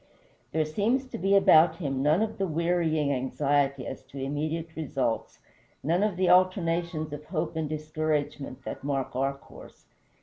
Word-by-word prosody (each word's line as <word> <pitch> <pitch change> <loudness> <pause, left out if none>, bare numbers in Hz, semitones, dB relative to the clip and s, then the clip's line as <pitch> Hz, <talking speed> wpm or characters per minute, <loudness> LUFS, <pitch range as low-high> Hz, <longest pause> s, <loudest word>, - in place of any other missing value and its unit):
There 160 0 +1
seems 215 - 0
to - - -6
be 195 +3 +3
about 165 -4 +6
him 135 -6 -2
none 155 +8 +3
of 220 -2 -4
the 195 - +1
wearying 165 -2 +1
anxiety 140 +1 0
as 130 - -6
to 140 - -12
immediate 155 +4 -3
results, 130 -7 -2 0.5
none 170 +5 +2
of 205 -4 0
the 185 0 +2
alternations 170 -3 +2
of 150 +1 -7
hope 165 -1 -3
and 160 -2 -2
discouragement 155 -3 -3
that - - -6
mark 135 -3 -2
our 135 +1 0
course. - - -15
155 Hz, 160 wpm, -28 LUFS, 140-175 Hz, 0.5 s, about